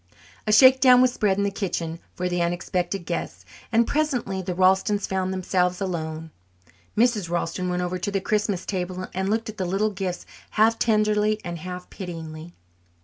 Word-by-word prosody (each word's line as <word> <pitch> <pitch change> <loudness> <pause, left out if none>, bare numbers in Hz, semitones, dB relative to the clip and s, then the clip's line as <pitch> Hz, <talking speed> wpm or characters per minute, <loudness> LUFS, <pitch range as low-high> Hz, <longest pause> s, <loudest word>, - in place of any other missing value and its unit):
A - - +2
shakedown 255 +2 +7
was 255 -1 +4
spread 200 -5 +1
in 200 - +1
the 200 - 0
kitchen 170 -5 -3 0.2
for 180 - -2
the 175 -1 -1
unexpected 175 +1 -2
guests, 90 - -4 0.3
and 235 0 +4
presently 250 -11 -1
the 180 -1 -4
Ralstons 190 +2 +3
found 190 -1 -1
themselves 180 -1 0
alone. 160 -4 -4 0.7
Mrs. 220 -6 +2
Ralston 175 +1 -2
went 180 0 -1
over 180 +1 -2
to 190 - -2
the 200 -1 0
Christmas 205 -2 -1
table 185 -1 -3
and 190 +1 -1
looked 225 +2 0
at 215 -1 -7
the 185 - 0
little 195 +4 0
gifts 185 -2 -4 0.3
half 225 +1 +4
tenderly 215 -1 +2
and 170 -1 -5
half 180 +1 -7
pityingly. 165 -3 -8
190 Hz, 170 wpm, -24 LUFS, 175-210 Hz, 0.7 s, shakedown